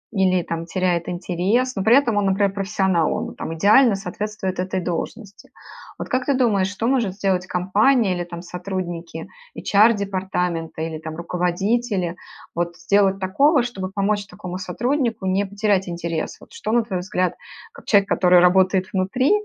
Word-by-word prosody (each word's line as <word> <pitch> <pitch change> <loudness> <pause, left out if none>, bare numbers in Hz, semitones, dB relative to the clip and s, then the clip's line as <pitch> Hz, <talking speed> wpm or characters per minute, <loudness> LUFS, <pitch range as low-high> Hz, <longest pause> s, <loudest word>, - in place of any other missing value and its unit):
или 185 -2 +2
там 165 0 -5
теряет 175 -2 -1
интерес, 190 +8 0
но 195 - -2
при 225 +5 +6
этом 235 -7 +2
он, 205 - +2
например, 195 0 +1
профессионал, 190 -4 0
он - - -3
там - - -5
идеально 215 +6 +5
соответствует 195 0 -4
этой 185 +1 -1
должности. 195 +4 -5 0.5
Вот - - -5
как 255 0 -1
ты 280 - +3
думаешь, 215 -7 +2
что 200 +3 -4
может 240 -8 +1
сделать 190 -2 0
компания 200 +5 +2
или 175 - -3
там 170 0 -8
сотрудники 175 -2 -5 0.3
HR-департамента 190 -6 +1
или 160 -1 -4
там 160 0 -7
руководители 180 +3 -1 0.4
вот 170 0 -3
сделать 195 +2 +2
такого, 265 - +3
чтобы 195 -6 -5
помочь 200 +1 -1
такому 180 -1 -7
сотруднику 230 +3 -1
не 190 +2 +1
потерять 200 -2 0
интерес? 170 -2 -4
Вот - - -17
что, 460 - -4
на 235 0 +3
твой 195 -5 -3
взгляд, 180 0 -1 0.4
как - - -15
человек, 200 -2 +4
который 180 -2 +4
работает 185 +1 +3
внутри, 195 +8 +1
190 Hz, 155 wpm, -22 LUFS, 180-210 Hz, 0.5 s, при